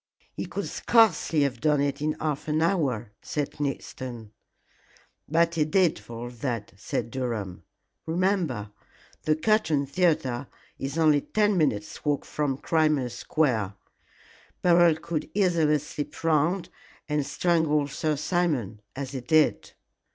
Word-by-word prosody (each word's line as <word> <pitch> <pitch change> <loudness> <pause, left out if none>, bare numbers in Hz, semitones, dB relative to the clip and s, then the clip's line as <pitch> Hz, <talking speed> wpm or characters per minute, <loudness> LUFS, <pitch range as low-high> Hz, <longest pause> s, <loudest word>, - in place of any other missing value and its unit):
"He - - -5
could - - -4
scarcely 185 -9 +3
have 130 -4 -2
done 150 -2 +3
it 140 0 -1
in 155 +1 +1
half 150 -1 -3
an 155 0 +1
hour," 135 - 0
said 145 -2 -3
Conniston. 130 -5 -5 1.0
"But 165 +2 +3
he 160 -2 +2
did 170 +2 +2
for 115 0 -8
all 120 - -5
that," 115 -3 -4
said 110 +3 -3
Durham. 115 -8 -3 0.5
"Remember, 165 - 0 0.5
the 155 - +3
Curtain 155 -6 +2
Theatre 140 -5 0 0.3
is 135 +3 -4
only 155 -3 +4
ten 210 +3 +1
minutes' 125 - 0
walk 145 -2 0
from 145 -3 -1
Crimea 155 -5 +1
Square. 115 -12 0 0.9
Beryl 175 -2 +6
could 160 -1 -4
easily 170 -6 +3
slip 150 +1 -6
round 165 +3 +2 0.4
and 150 -1 0
strangle 155 -2 +1
Sir 150 +2 -1
Simon 145 - -1
as 135 -1 -4
he 135 -2 -4
did." 155 +5 +2
150 Hz, 130 wpm, -26 LUFS, 130-165 Hz, 1.0 s, Beryl